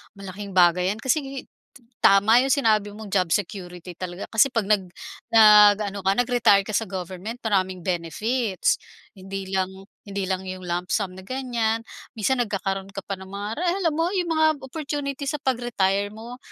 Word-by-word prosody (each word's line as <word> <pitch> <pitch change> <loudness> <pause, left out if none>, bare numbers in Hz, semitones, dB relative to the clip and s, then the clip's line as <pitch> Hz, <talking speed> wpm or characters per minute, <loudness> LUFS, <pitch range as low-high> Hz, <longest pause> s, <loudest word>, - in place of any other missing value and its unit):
malaking 195 +1 -8
bagay 180 0 +4
yan. - - -12
Kasi, 265 +4 +2 0.2
t - - -28 0.6
tama 200 +4 +6
yong 270 - +2
sinabi 215 -6 +2
mong 215 -2 -9
job 185 -3 +2
security 180 -3 -5
talaga. 180 0 -5
Kasi, 225 +4 +5
'pag 230 -3 0
nag 210 -2 +4 0.5
nag-ano 210 -2 +6
ka, 195 - +4
nag-retire 235 -5 +4
ka - - -4
sa 225 - +1
government 185 +4 -6
maraming 190 -4 0
benefits. 190 - 0 0.4
Hindi 195 0 -7
lang, 185 -1 +1 0.4
hindi 200 -1 -3
lang 190 0 -2
yong 185 0 -6
lump 175 +1 -2
sum 200 -5 0
na 190 - -11
ganyan. 235 -3 -1 0.3
Minsan, 245 +4 0
nagkakaroon 195 -2 -3
ka - - -3
pa 195 - -4
ng 190 - -10
mga 200 +1 -5
re - - -2 0.2
alam 335 -4 +1
mo 330 +1 +1
yong 360 -4 -1
mga 315 -1 +3 0.2
opportunity 280 0 -4
sa 300 +1 -2
pag-retire 205 -7 0
mo. 235 +3 -9
205 Hz, 170 wpm, -24 LUFS, 190-240 Hz, 0.6 s, tama